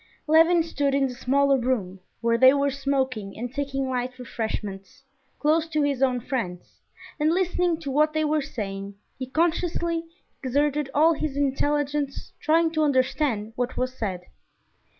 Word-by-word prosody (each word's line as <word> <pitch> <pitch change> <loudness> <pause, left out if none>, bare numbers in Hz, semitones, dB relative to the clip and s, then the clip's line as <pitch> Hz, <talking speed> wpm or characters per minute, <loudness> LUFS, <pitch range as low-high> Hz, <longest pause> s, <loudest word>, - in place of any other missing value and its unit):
Levin 330 +2 +5
stood 285 -4 0
in 275 -1 +2
the 250 - -6
smaller 275 +2 +2
room, 215 -7 -1 0.2
where 230 0 +2
they 260 +3 +7
were 280 0 +1
smoking 265 -7 -2
and 245 +2 -5
taking 275 -1 -2
light 250 0 -3
refreshments, 215 -3 -5 0.3
close 315 +2 +2
to 305 -2 0
his 280 -2 0
own 255 -2 +2
friends, 225 -8 -5 0.4
and 305 +1 +3
listening 360 -2 +1
to 285 -4 -5
what 305 +3 +3
they 310 0 +1
were 305 0 +1
saying, 200 -5 -5 0.2
he 260 - -4
conscientiously 335 +2 0 0.4
exerted 285 +2 0
all 320 +3 +5
his 300 -2 -3
intelligence 285 0 -1
trying 325 +1 +3
to 310 -1 0
understand 260 -5 +1
what 245 +1 -2
was 255 0 -1
said. 190 -7 -3
275 Hz, 150 wpm, -25 LUFS, 250-305 Hz, 0.4 s, they